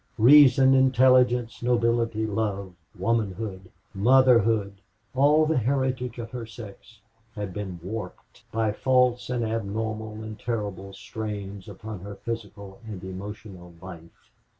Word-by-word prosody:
Reason, 135 +1 +7
intelligence, 130 -2 +3
nobility, 115 -2 +1
love, 100 -3 -3 0.2
womanhood, 100 -2 -2 0.2
motherhood 115 -3 +3 0.3
all 145 +4 +4
the 155 -3 +1
heritage 130 0 -1
of 115 -1 -7
her 120 -3 -6
sex 115 0 -12 0.4
had 100 -3 -5
been 95 -3 -6
warped 105 +4 -8
by 110 -1 0
false 125 +1 +1
and 120 -2 -1
abnormal 110 0 -4
and 110 -1 -8
terrible 100 -4 -4
strains 100 -1 -7
upon 105 +1 -8
her 100 +3 -8
physical 100 -2 -7
and 100 -4 -8
emotional 95 -2 -9
life. 85 -3 -13
110 Hz, 115 wpm, -25 LUFS, 100-120 Hz, 0.4 s, Reason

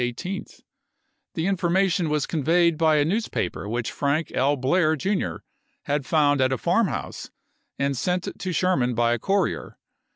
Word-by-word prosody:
18th. 175 +11 -5 0.7
The 160 - -1
information 185 -2 +1
was 150 -1 0
conveyed 170 +2 +2
by 155 0 +3
a 145 -1 +3
news 215 +8 0
juiy,i864. - - -24
paper 100 - -3
which 115 0 -2
Frank 145 +3 0
P. 140 +3 +1
Blair, 155 +4 +2
Jr., 190 +6 -1 0.5
had 145 -2 -2
found 145 -3 +3
at 130 0 +2
a 130 - 0
farmhouse - - -1 0.5
and 140 0 0
sent 180 +7 -1
to 185 0 -3
Sherman 150 -10 +1
by 120 0 +2
a 120 - -2
courier. 195 - -1
155 Hz, 160 wpm, -24 LUFS, 135-180 Hz, 0.7 s, by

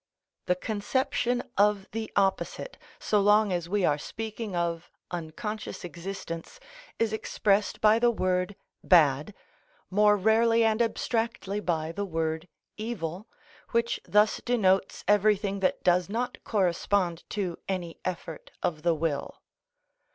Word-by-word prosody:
The 180 - +3
conception 240 +5 -1 0.2
of 205 -1 +3
the 225 0 -4
opposite, 195 - 0 0.2
so 210 - +1
long 205 0 +4
as 175 -1 -2
we 200 -1 +2
are 150 0 +2
speaking 220 +1 -5
of 170 -1 -2 0.2
unconscious 175 +6 -5
existence, 175 - -7 0.4
is 225 -1 0
expressed 210 -1 0
by 215 +1 +5
the 240 0 +4
word 185 -3 0 0.3
bad, 155 +1 +4 0.6
more 210 +1 +5
rarely 225 +3 +4
and 220 +1 +2
abstractly 225 -3 -1
by 165 -5 -1
the 200 +4 -3
word 160 -1 -2 0.3
evil, 210 -4 -4 0.5
which 235 0 +1
thus 210 +1 +3
denotes 195 -6 +1
everything 205 -1 +3
that 185 -1 0
does 180 0 +3
not 240 +4 -3
correspond 180 -3 0
to 190 -5 -3
any 175 -3 -3
effort 170 -3 -5
of 155 -3 -1
the 170 0 +2
will. 150 -2 -2
200 Hz, 125 wpm, -28 LUFS, 175-215 Hz, 0.6 s, by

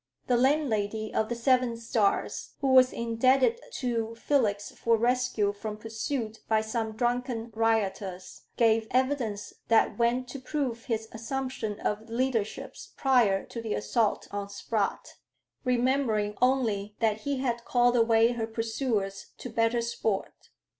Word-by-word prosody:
The 250 - +2
landlady 225 -6 +1
of 220 - 0
the 240 - -1
Seven 245 0 +2
Stars, 230 -3 -1
who 275 - 0
was 255 -1 +6
indebted 255 - +2
to 230 -3 -2
Felix 220 -6 0
for 230 -1 +1
rescue 240 -3 +1
from 210 +1 -6
pursuit 225 +1 -4
by 220 -1 +3
some 220 0 -3
drunken 240 0 -1
rioters, 200 -4 -1
gave 225 -1 +3
evidence 250 -6 -1
that 230 +1 +3
went 240 +2 +1
to 275 - -6
prove 255 -4 -3
his 225 -3 -2
assumption 230 -2 -4
of 215 +2 -3
leadership 230 -3 -2 0.2
prior 240 -8 +3
to 230 - -7
the 225 -2 -2
assault 220 0 0
on 200 0 -4
Spratt, 200 0 -3 0.5
remembering 245 -5 +1
only 220 -6 +1
that 220 -2 +1
he 275 +5 -2
had 240 -3 -1
called 245 0 +3
away 230 0 +4
her 230 -2 -2
pursuers 225 -3 -2
to 250 - -7
"better 230 +1 +2
sport." 225 -4 -2
230 Hz, 135 wpm, -28 LUFS, 215-250 Hz, 0.5 s, was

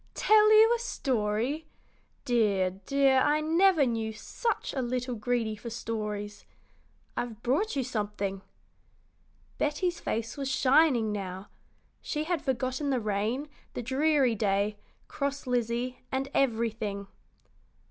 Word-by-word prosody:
"Tell 430 0 +5
you 440 +2 +7
a - - -4
story! 260 - -1 0.6
Dear, 205 -6 +2 0.2
dear, 275 -1 +4
I 295 +3 +3
never 325 0 +4
knew 225 -2 -2
such 455 - -3
a 265 - -1
little 250 +1 -2
greedy 225 -1 -1
for 225 +3 -8
stories. 210 -3 -4 0.7
I've 230 -2 -4
brought 295 - +1
you 270 - 0
something." 205 -5 -3 1.2
Betty's 340 +4 0
face 225 +2 -3
was 275 -1 -2
shining 265 -4 +4
now. 190 -1 -5 0.5
She 300 -1 -2
had 335 -1 -1
forgotten 260 +2 -1
the 260 -2 +1
rain, 215 +6 -1 0.3
the 245 - -3
dreary 270 0 +2
day, 205 0 0 0.3
cross 280 0 -3
Lizzie, 245 0 -1
and 270 +1 -1
everything. 225 -5 0
245 Hz, 120 wpm, -29 LUFS, 215-285 Hz, 1.2 s, you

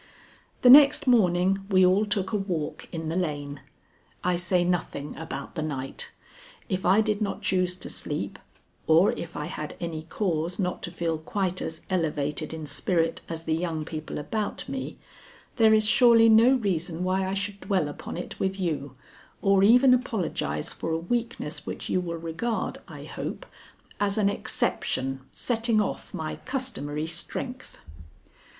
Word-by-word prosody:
The 250 - +8
next 290 +1 +8
morning 195 -5 +3
we 185 -2 +5
all 195 +4 +3
took 195 -2 +1
a - - 0
walk 180 -7 -3
in 160 -2 -4
the 165 - -2
lane. 145 -5 -3 0.6
(I 180 0 +2
say 175 +1 +1
nothing 175 -5 -2
about 155 -4 -6
the 160 - -3
night. 135 -4 -4 0.6
If 185 -2 -1
I 195 +4 +6
did 215 -1 -1
not 200 -2 -2
choose 180 -1 +1
to 185 - -7
sleep, 100 -10 -4 0.5
or 165 +5 +6
if 170 - -6
I 150 - -3
had 155 -2 -6
any 165 -2 -4
cause 170 0 -2
not 180 -3 -2
to 175 - -5
feel 165 -2 -2
quite 185 +2 -2
as 160 - -5
elevated 155 -4 -1
in 160 -1 -5
spirit 165 +3 0
as 165 -1 -5
the 160 - 0
young 160 -2 -2
people 155 -1 -6
about 205 +8 -3
me, 265 0 -5 0.6
there 220 -2 +6
is 215 0 +4
surely 230 0 +6
no 230 +4 +7
reason 175 -7 -1
why 185 +1 +1
I 190 - -2
should 200 0 -3
dwell 190 -8 0
upon 145 - -7
it 175 - -7
with 190 +1 -1
you 150 -7 -2 0.4
or 195 -1 +3
even 250 +6 +7
apologize 185 - -1
for - - -5
a 160 - +1
weakness 180 -3 -3
which - - -5
you 185 - +2
will 170 -1 -4
regard, 165 +8 -3
I - - -9
hope, - - -6 0.5
as 200 0 +1
an 205 -2 +3
exception 135 -8 -1
setting 230 -2 +1
off 210 - -2
my 155 -1 -4
customary 160 - -3
strength.) 250 +9 -5
180 Hz, 160 wpm, -26 LUFS, 160-210 Hz, 0.6 s, The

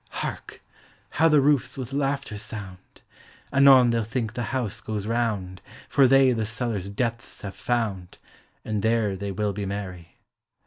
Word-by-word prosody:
Hark! - - -6 0.5
how 165 +2 +3
the 150 -2 +5
roofs 135 -3 +2
with 130 0 -6
laughter 140 -5 -1
sound! 100 -4 -9 0.5
Anon 135 -3 +7
they'll 115 -1 +1
think 110 0 -3
the 120 - -3
house 125 -6 -3
goes 105 -2 -4
round, 105 -6 -2 0.3
For 135 -2 +5
they 135 0 +5
the 115 -2 0
cellar's 115 -4 -3
depths 115 +4 -3
have 100 -1 -5
found. 100 -5 -2 0.5
And 105 -2 -2
there 110 -3 +1
they 100 +1 -4
will 105 +1 -1
be 100 0 -4
merry. 90 -3 -6
115 Hz, 150 wpm, -25 LUFS, 100-130 Hz, 0.5 s, Anon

